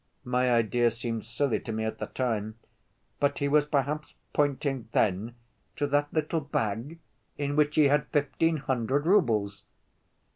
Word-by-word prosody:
My 125 Hz, 0 st, +1 dB
idea 120 Hz, +1 st, +3 dB
seemed 115 Hz, -1 st, -4 dB
silly 120 Hz, +3 st, 0 dB
to 115 Hz, -, -6 dB
me 110 Hz, 0 st, -2 dB
at 110 Hz, -, -4 dB
the 105 Hz, -, -3 dB
time, 110 Hz, -3 st, -2 dB, 0.6 s
but 145 Hz, -, +1 dB
he 140 Hz, -, 0 dB
was 150 Hz, +1 st, +3 dB
perhaps 150 Hz, +1 st, -1 dB, 0.2 s
pointing 140 Hz, -4 st, 0 dB
then 105 Hz, +3 st, +1 dB, 0.4 s
to 145 Hz, -, 0 dB
that 145 Hz, +1 st, +1 dB
little 155 Hz, +1 st, 0 dB
bag 125 Hz, +2 st, -2 dB, 0.4 s
in 145 Hz, 0 st, -2 dB
which 150 Hz, 0 st, +2 dB
he 155 Hz, -, +6 dB
had 145 Hz, 0 st, +2 dB
fifteen 155 Hz, +3 st, +1 dB
hundred 130 Hz, +1 st, -1 dB
roubles!" 110 Hz, -, +2 dB
135 Hz, 150 wpm, -28 LUFS, 115-145 Hz, 0.6 s, he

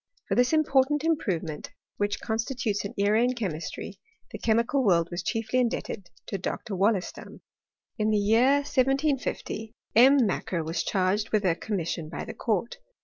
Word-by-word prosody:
For -, -, -1 dB
this 245 Hz, 0 st, +3 dB
important 295 Hz, -2 st, +3 dB
improvement, 185 Hz, -, -1 dB, 0.3 s
which 205 Hz, -1 st, -1 dB
constitutes 225 Hz, -1 st, -2 dB
an 200 Hz, -, -6 dB
era 205 Hz, +3 st, +3 dB
in 250 Hz, +1 st, +1 dB
chemistry, 180 Hz, -9 st, -5 dB, 0.3 s
the -, -, -7 dB
chemical 235 Hz, +4 st, +2 dB
world 170 Hz, -6 st, +3 dB
was 175 Hz, +1 st, -3 dB
chiefly 225 Hz, +4 st, -1 dB
indebted 225 Hz, -6 st, -2 dB, 0.2 s
to 195 Hz, -, -4 dB
Dr. 200 Hz, +3 st, -4 dB
Wollaston. 195 Hz, 0 st, -1 dB, 0.6 s
In 215 Hz, 0 st, +2 dB
the 215 Hz, -, +3 dB
year 225 Hz, +6 st, +4 dB
1750 270 Hz, -5 st, -1 dB, 0.2 s
M. 260 Hz, +5 st, +7 dB
Macquer 180 Hz, -3 st, -2 dB
was 160 Hz, +1 st, -2 dB
charged 200 Hz, +3 st, 0 dB
with 215 Hz, -2 st, +1 dB
a 180 Hz, -, +4 dB
commission 170 Hz, -4 st, -3 dB
by -, -, -5 dB
the -, -, -7 dB
court. 225 Hz, +1 st, -2 dB
215 Hz, 150 wpm, -27 LUFS, 190-250 Hz, 0.6 s, M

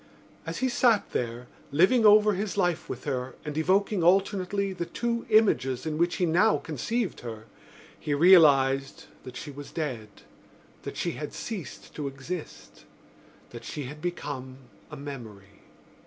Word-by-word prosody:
As -, -, -4 dB
he -, -, +3 dB
sat 240 Hz, -3 st, +2 dB
there, 120 Hz, 0 st, -3 dB, 0.3 s
living 200 Hz, -, +5 dB
over 210 Hz, 0 st, +6 dB
his 200 Hz, +1 st, -3 dB
life 175 Hz, -4 st, 0 dB
with 125 Hz, -, -6 dB
her 130 Hz, -2 st, -3 dB
and 150 Hz, -1 st, -5 dB
evoking 190 Hz, +3 st, +1 dB
alternately 195 Hz, +2 st, +2 dB
the 170 Hz, -2 st, -4 dB
two 235 Hz, -1 st, -3 dB
images 135 Hz, -, +3 dB
in 155 Hz, -1 st, -3 dB
which 175 Hz, +1 st, +2 dB
he 185 Hz, -, +1 dB
now 180 Hz, +7 st, +3 dB
conceived 190 Hz, -, -3 dB
her, 110 Hz, -2 st, -8 dB, 0.5 s
he 150 Hz, -2 st, -1 dB
realised 140 Hz, -5 st, +5 dB, 0.2 s
that 130 Hz, -1 st, -8 dB
she 145 Hz, -, -7 dB
was 145 Hz, +1 st, -10 dB
dead, 125 Hz, -9 st, -4 dB, 0.7 s
that -, -, -7 dB
she -, -, -1 dB
had -, -, -6 dB
ceased -, -, -7 dB
to 145 Hz, -, -4 dB
exist, 135 Hz, -, -8 dB, 0.7 s
that 120 Hz, -, -9 dB
she 150 Hz, -, -5 dB
had 150 Hz, +4 st, -9 dB
become 145 Hz, -7 st, -5 dB, 0.3 s
a 150 Hz, -, -9 dB
memory. 110 Hz, -9 st, -10 dB
155 Hz, 150 wpm, -27 LUFS, 135-195 Hz, 0.7 s, over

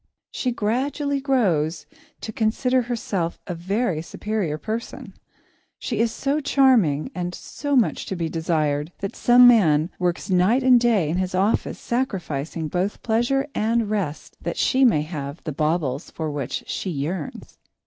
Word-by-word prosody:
She 250 Hz, -, -1 dB
gradually 275 Hz, +6 st, -1 dB
grows 185 Hz, -, +1 dB, 0.4 s
to 220 Hz, -, -5 dB
consider 250 Hz, +4 st, +1 dB
herself 210 Hz, -8 st, -3 dB
a 180 Hz, -, -4 dB
very 185 Hz, 0 st, -1 dB
superior 190 Hz, -2 st, -3 dB
person. 225 Hz, +8 st, -6 dB, 0.6 s
She 230 Hz, -4 st, -3 dB
is 230 Hz, 0 st, +2 dB
so 280 Hz, +5 st, -1 dB
charming 255 Hz, -, +3 dB
and 180 Hz, -2 st, -4 dB
so 285 Hz, -1 st, -3 dB
much 245 Hz, -4 st, +1 dB
to 190 Hz, -, -3 dB
be 170 Hz, -2 st, -2 dB
desired, 155 Hz, -2 st, -1 dB
that 195 Hz, -, -4 dB
some 245 Hz, 0 st, +6 dB
man 170 Hz, -9 st, +4 dB
works 180 Hz, 0 st, -1 dB
night 195 Hz, +7 st, +3 dB
and 255 Hz, -1 st, +6 dB
day 225 Hz, -9 st, +2 dB
in 165 Hz, +4 st, -1 dB
his 185 Hz, 0 st, -1 dB
office, 195 Hz, +4 st, +1 dB
sacrificing 170 Hz, -, -3 dB
both 180 Hz, +6 st, -2 dB
pleasure 240 Hz, +5 st, +1 dB
and 225 Hz, 0 st, 0 dB
rest, 185 Hz, -8 st, -3 dB
that -, -, -4 dB
she 265 Hz, 0 st, +2 dB
may 165 Hz, -, +4 dB
have 150 Hz, -1 st, -6 dB
the 155 Hz, -, -4 dB
baubles 150 Hz, -2 st, -1 dB
for 160 Hz, -2 st, -4 dB
which 140 Hz, -4 st, -4 dB
she 190 Hz, -, -4 dB
yearns. 155 Hz, +1 st, -5 dB
195 Hz, 150 wpm, -23 LUFS, 160-240 Hz, 0.6 s, some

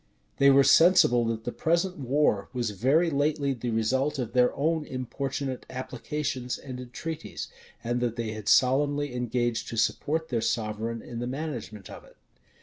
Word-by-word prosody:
They 140 Hz, -, +6 dB
were 140 Hz, 0 st, +6 dB
sensible, 160 Hz, -8 st, +5 dB
that 115 Hz, -1 st, -2 dB
the 120 Hz, -, -3 dB
present 170 Hz, +4 st, 0 dB
war 130 Hz, -6 st, +1 dB
was 120 Hz, -4 st, -1 dB
very 140 Hz, -, +2 dB
lately 145 Hz, -1 st, +1 dB
the 120 Hz, -1 st, -4 dB
result 130 Hz, +6 st, 0 dB
of 120 Hz, -4 st, -4 dB
their 125 Hz, -1 st, +4 dB
own 160 Hz, +2 st, 0 dB
importunate 135 Hz, 0 st, -4 dB
applications 130 Hz, -1 st, -4 dB
and 130 Hz, -2 st, -8 dB
entreaties, 130 Hz, +6 st, -6 dB, 0.3 s
and 120 Hz, +1 st, -1 dB
that 120 Hz, -2 st, -1 dB
they 115 Hz, -2 st, -3 dB
had 110 Hz, -1 st, -7 dB
solemnly 145 Hz, +2 st, +3 dB
engaged 120 Hz, -1 st, -1 dB
to 115 Hz, -, -6 dB
support 160 Hz, +8 st, 0 dB
their 115 Hz, -3 st, 0 dB
sovereign 115 Hz, 0 st, -2 dB
in 120 Hz, -1 st, -7 dB
the 120 Hz, -, -3 dB
management 125 Hz, -8 st, -5 dB
of -, -, -10 dB
it. -, -, -20 dB
130 Hz, 160 wpm, -27 LUFS, 115-145 Hz, 0.3 s, They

